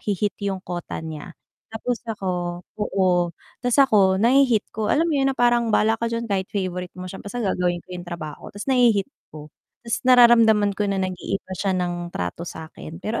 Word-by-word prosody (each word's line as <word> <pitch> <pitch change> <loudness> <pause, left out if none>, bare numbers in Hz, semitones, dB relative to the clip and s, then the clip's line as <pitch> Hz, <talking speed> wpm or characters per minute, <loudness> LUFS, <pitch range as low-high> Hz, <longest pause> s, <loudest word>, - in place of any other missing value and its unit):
nahihit 205 0 -2
'yung 195 -2 -3
quota 175 -2 -5
niya. 160 +1 -8 0.3
Tapos 225 +1 -3
ako 200 -4 -3 0.5
oo 180 -4 +1 0.3
'tas 245 +1 +1
ako 195 -7 +4
nahihit 240 0 +4
ko 215 -1 -2
alam 320 +3 +3
mo 290 - +1
yun 270 0 +2
na 270 - -2
parang, 240 -1 +3
"Bahala 220 +1 +3
ka 235 - 0
diyan 230 0 -3
kahit 190 -1 0
favourite 180 -2 -4
mo 180 - -7
siya, 190 - -8
basta 235 +4 -5
gagawin 180 -3 0
ko - - -45
'yong 175 - -9
trabaho." 160 -3 -7
'Tas 205 - -6
nahihit 235 -6 +4 0.3
ko 150 0 -10 0.3
'tas 230 -1 -1
nararamdaman 230 -4 +6
ko 210 - +1
na 195 - 0
nag-iiba 185 +1 -4
siya 195 -2 0
ng 175 -1 -2
trato 90 - -4
sa 160 0 -8
akin 160 - -9
pero 225 +2 -2
200 Hz, 190 wpm, -23 LUFS, 180-230 Hz, 0.5 s, nararamdaman